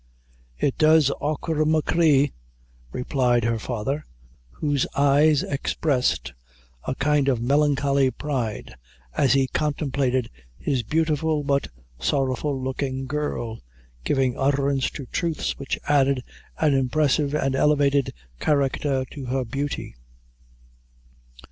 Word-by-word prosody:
"It 135 Hz, -, -1 dB
does, 155 Hz, -2 st, +5 dB
achora 155 Hz, +1 st, -1 dB
machree," 155 Hz, -2 st, +3 dB, 0.6 s
replied 125 Hz, -2 st, +1 dB
her 115 Hz, 0 st, 0 dB
father, 125 Hz, +6 st, -3 dB, 0.5 s
whose 145 Hz, -, -1 dB
eyes 145 Hz, +1 st, +4 dB
expressed 130 Hz, -, -1 dB, 0.5 s
a 130 Hz, -, -1 dB
kind 145 Hz, 0 st, +1 dB
of 130 Hz, -4 st, +2 dB
melancholy 140 Hz, +1 st, +2 dB
pride, 125 Hz, -, -4 dB, 0.4 s
as 135 Hz, -2 st, +3 dB
he 135 Hz, -1 st, +3 dB
contemplated 140 Hz, -4 st, -1 dB, 0.3 s
his 135 Hz, -4 st, -1 dB
beautiful 155 Hz, +3 st, 0 dB
but 140 Hz, 0 st, 0 dB, 0.3 s
sorrowful 135 Hz, -, 0 dB
looking 130 Hz, 0 st, -3 dB
girl, 130 Hz, -5 st, -3 dB, 0.4 s
giving 130 Hz, -, +1 dB
utterance 140 Hz, 0 st, +1 dB
to 140 Hz, -, -8 dB
truths 165 Hz, +3 st, -2 dB
which 140 Hz, -, -3 dB
added 140 Hz, -3 st, +3 dB, 0.3 s
an 155 Hz, -3 st, +2 dB
impressive 140 Hz, +2 st, +1 dB
and 135 Hz, -3 st, 0 dB
elevated 140 Hz, -1 st, +2 dB, 0.3 s
character 140 Hz, -2 st, +1 dB
to 140 Hz, -3 st, -7 dB
her 130 Hz, +1 st, -1 dB
beauty. 140 Hz, -, -4 dB
140 Hz, 105 wpm, -24 LUFS, 130-150 Hz, 0.6 s, does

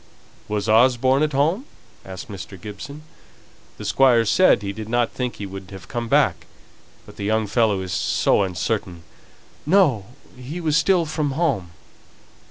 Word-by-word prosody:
"Was 105 Hz, 0 st, -2 dB
Osborne 125 Hz, +4 st, +4 dB
at 155 Hz, 0 st, +1 dB
home?" 160 Hz, -, +1 dB, 0.4 s
asked 95 Hz, -1 st, -9 dB
Mr. 95 Hz, -1 st, -9 dB
Gibson. 110 Hz, -, -9 dB, 0.7 s
"The -, -, -8 dB
Squire 125 Hz, -4 st, +4 dB
said 110 Hz, -, +4 dB
he 100 Hz, 0 st, -3 dB
did 110 Hz, +1 st, -8 dB
not 120 Hz, 0 st, +1 dB
think 125 Hz, -2 st, -4 dB
he 100 Hz, -, -6 dB
would 95 Hz, -1 st, -9 dB
have 95 Hz, -3 st, -11 dB
come 120 Hz, -1 st, -4 dB
back; -, -, +2 dB, 0.6 s
but -, -, -15 dB
the -, -, -6 dB
young 110 Hz, +1 st, +1 dB
fellow 105 Hz, -2 st, +1 dB
is 90 Hz, -2 st, -5 dB
so 80 Hz, +4 st, +2 dB
uncertain 90 Hz, -2 st, -3 dB, 0.3 s
" -, -, -29 dB
"No, 130 Hz, -, +3 dB, 0.3 s
he 130 Hz, +7 st, -7 dB
was 155 Hz, -3 st, 0 dB
still 170 Hz, +2 st, +3 dB
from 150 Hz, -2 st, -2 dB
home." 135 Hz, -, -1 dB
115 Hz, 160 wpm, -22 LUFS, 100-140 Hz, 0.7 s, Osborne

